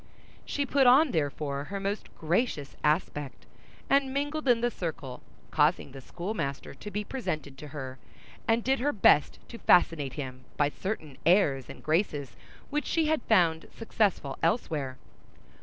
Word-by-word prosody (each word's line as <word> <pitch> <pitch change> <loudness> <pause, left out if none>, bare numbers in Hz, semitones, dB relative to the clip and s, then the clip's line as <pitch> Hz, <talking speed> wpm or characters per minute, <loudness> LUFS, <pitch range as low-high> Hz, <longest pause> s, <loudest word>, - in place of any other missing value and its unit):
She 285 - -1
put 275 -1 +3
on, 270 +4 +6
therefore, 145 -3 -2
her 200 +4 -5
most 200 +2 -3
gracious 165 - -1
aspect, 150 -2 -1 0.4
and 275 -1 +3
mingled 290 +2 -2
in 240 -2 +4
the 240 0 +1
circle; 150 - -5 0.3
caused 155 +3 +4 0.2
the 135 - -9
schoolmaster 170 - -4
to 175 +9 -9
be 210 +1 -3
presented 155 - -4
to 150 - -8
her, 135 -3 -7 0.5
and 225 +1 +2
did 270 +1 +2
her 290 +4 +1
best 150 -7 +4
to 230 - -9
fascinate 160 -6 +3
him 130 -2 -7
by 145 -1 +3
certain 155 -5 -5
airs 155 -7 +3
and - - -10
graces 155 -4 0 0.4
which 295 +1 -1
she 325 -1 +1
had 315 -4 +1
found 170 -6 +3
successful 205 - 0
elsewhere. 155 - 0
170 Hz, 150 wpm, -29 LUFS, 145-235 Hz, 0.5 s, on